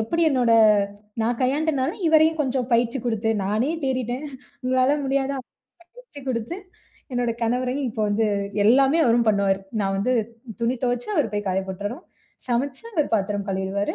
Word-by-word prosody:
எப்படி 335 +10 0
என்னோட 250 -4 +2 0.7
நான் 230 +1 0
கையாண்டனால 280 +1 +1
இவரையும் 320 0 +4
கொஞ்சம் 260 -3 -1
பயிற்சி 235 +3 +2
குடுத்து 225 -2 -1 0.2
நானே 215 +8 0
தேறிட்டேன் 255 +1 -2 0.4
உங்களால 255 +2 +2
முடியாதா? 275 0 0 0.6
பயிற்சி - - -13
குடுத்து 235 +6 -2 0.6
என்னோட 245 -1 0
கணவரையும் 250 +3 0
இப்போ 220 0 -3
வந்து 215 +2 +1 0.4
எல்லாமே 270 +7 +5
அவரும் 235 -1 +3
பண்ணுவாரு. 200 -2 +2 0.2
நான் 195 -1 0
வந்து 250 +6 +1 0.5
துணி 235 +2 +1
துவைச்சா 245 - -1
அவரு 270 -9 +1
போய் 205 0 -2
காய 190 +1 0
போட்டுறணும். 205 +6 -5 0.4
சமைச்சா 260 - -2
அவரு 305 -3 +1
பாத்திரம் 200 0 -2
கழுவிடுவாரு. 190 +1 -2
245 Hz, 140 wpm, -23 LUFS, 215-275 Hz, 0.7 s, எல்லாமே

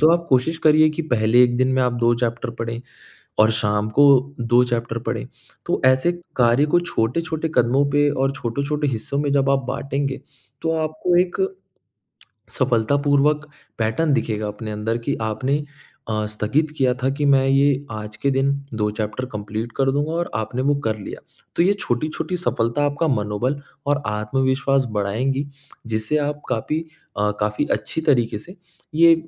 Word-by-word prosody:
तो 155 +2 +6
आप 170 0 0
कोशिश 130 +5 +2
करिए 155 0 +6
कि 165 - -1
पहले 120 -4 +3
एक 120 -1 +3
दिन 130 0 +3
में 130 - +2
आप 125 -1 +1
2 120 0 +4
चैप्टर 115 0 -1
पढ़ें 115 0 -3 0.6
और 110 +1 +6
शाम 105 -1 0
को 145 - +8 0.4
2 120 +1 +4
चैप्टर 120 -1 -2
पढ़े, - - -2 0.4
तो - - 0
ऐसे 130 +7 +4 0.2
कार्य 125 +3 +4
को 175 - +6
छोटे-छोटे 160 +2 -1
कदमों 125 +4 +3
पे 145 0 +3
और 135 -1 +1
छोटे-छोटे 140 +5 -2
हिस्सों 125 +3 -3
में 145 0 0
जब 135 -1 +2
आप 135 -1 +1
बाटेंगे, 135 +1 -2 0.4
तो 160 - 0
आपको 155 +3 0
एक, 180 -1 -5 1.2
सफलतापूर्वक 140 +5 +2 0.3
पैटर्न 115 +8 +1
दिखेगा 110 -3 -1
अपने 105 +1 -6
अंदर 110 +2 -2
कि 130 +4 -2
आपने 130 +7 -1 0.5
अ, 110 -1 -1
स्थगित 110 +9 0
किया 130 -3 +3
था 130 - +2
कि 145 +1 -2
मैं 135 -1 +4
ये 140 0 +3
आज 105 0 -6
के 140 - 0
दिन 135 +1 +2 0.2
2 105 -1 0
चैप्टर 110 +4 -3
कंप्लीट 110 +2 -4
कर 135 -1 +2
दूँगा 145 +3 -1
और 170 +1 -2
आपने 110 +4 -2
वो 145 +1 +2
कर 110 -1 0
लिया। 100 - -8 0.4
तो - - +4
ये 190 - +4
छोटी-छोटी 155 - -2
सफलता 145 -5 0
आपका 145 +3 0
मनोबल 120 +3 -1 0.3
और 145 0 +1
आत्मविश्वास 130 +5 +1
बढ़ाएँगी, 130 +8 0 0.4
जिससे 110 +5 -1
आप 145 0 -2
कापी 130 +6 -1 0.4
अ, 105 0 +2
काफ़ी 105 0 0
अच्छी 105 +9 -2
तरीके 120 -5 +2
से, 180 - -12 0.4
ये 165 +1 +7
130 Hz, 165 wpm, -22 LUFS, 110-145 Hz, 1.2 s, को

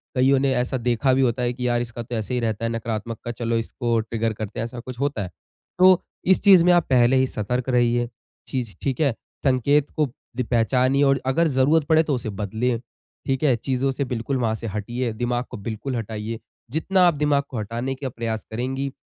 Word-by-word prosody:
कईयों 130 +1 +4
ने 135 0 +2
ऐसा 125 +2 0
देखा 125 +2 +1
भी 135 - +3
होता 125 -1 +1
है 120 0 0
कि 125 0 -3
यार! 120 0 +1
इसका 120 0 -5
तो 120 +1 -5
ऐसे 110 +1 -3
ही 125 - +1
रहता 115 -1 -1
है - - 0
नकारात्मकता। 115 0 -4
चलो, 115 0 -1
इसको 115 +1 -1
ट्रिगर 115 0 -2
करते 105 -1 -6
हैं। - - 0
ऐसा 120 +1 -7
कुछ 125 0 -8
होता 140 -6 -1
है। 90 - -6 0.5
तो 185 0 +7 0.3
इस - - -2
चीज़ 190 -4 +8
में 180 - +6
आप 175 -2 +3
पहले 125 0 +4
ही 130 0 +3
सतर्क 125 +3 -2
रहिए। 120 -1 +2 0.4
चीज़ 125 -6 -4
ठीक 135 -3 -2
है? 140 -5 +3 0.3
संकेत 140 +2 +3
को 150 -2 +3 0.3
ज़ - - +2
पहचानिए 130 +4 +3
और 135 -1 +3
अगर 155 +6 +2
ज़रूरत 145 +2 +3
पड़े, 160 0 +5
तो 150 -3 0
उसे 120 -2 -4
बदलें। 110 +4 -1 0.5
ठीक 135 +2 -1
है? 135 -5 +4
चीज़ों 130 +3 -1
से 135 +1 -2
बिल्कुल 125 +2 -2
वहाँ 115 -3 0
से 115 +1 -6
हटिए, 120 +4 -2
दिमाग 120 +2 -1
को - - -6
बिल्कुल 110 +5 -4
हटाइए। 110 0 -4 0.3
जितना 185 +6 +1
आप 175 - +4
दिमाग 145 -1 +1
को 125 - -4
हटाने 120 +5 -3
के 135 0 -4
प्रयास 115 -2 -4
करेंगी, 135 +4 -2
125 Hz, 215 wpm, -23 LUFS, 115-135 Hz, 0.5 s, चीज़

